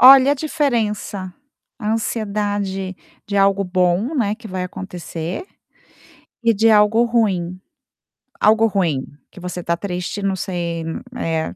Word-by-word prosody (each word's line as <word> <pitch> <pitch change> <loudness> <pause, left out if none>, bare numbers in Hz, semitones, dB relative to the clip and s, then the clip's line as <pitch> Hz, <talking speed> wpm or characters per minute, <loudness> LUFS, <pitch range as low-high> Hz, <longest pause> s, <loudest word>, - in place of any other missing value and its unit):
Olha, 270 +2 +9
a - - +2
diferença, 230 - -1 0.5
a 215 -1 -1
ansiedade 205 -4 -2 0.3
de 200 - -2
algo 195 0 +4
bom, 185 - +1
né, 215 -6 +1
que 225 -1 -11
vai 185 -1 -3
acontecer, 180 - -5 1.0
e 230 -1 +5
de 225 +3 +4
algo 215 +2 +5
ruim. 190 -7 +1 0.8
Algo 220 +1 +5
ruim, 170 -10 0 0.3
que 190 - -13
você 180 -1 -5
tá 170 - +1
triste 180 +1 -4
não 195 -1 0
sei, 170 -3 -3 0.3
eh, 165 -8 -2
200 Hz, 130 wpm, -20 LUFS, 180-225 Hz, 1.0 s, Olha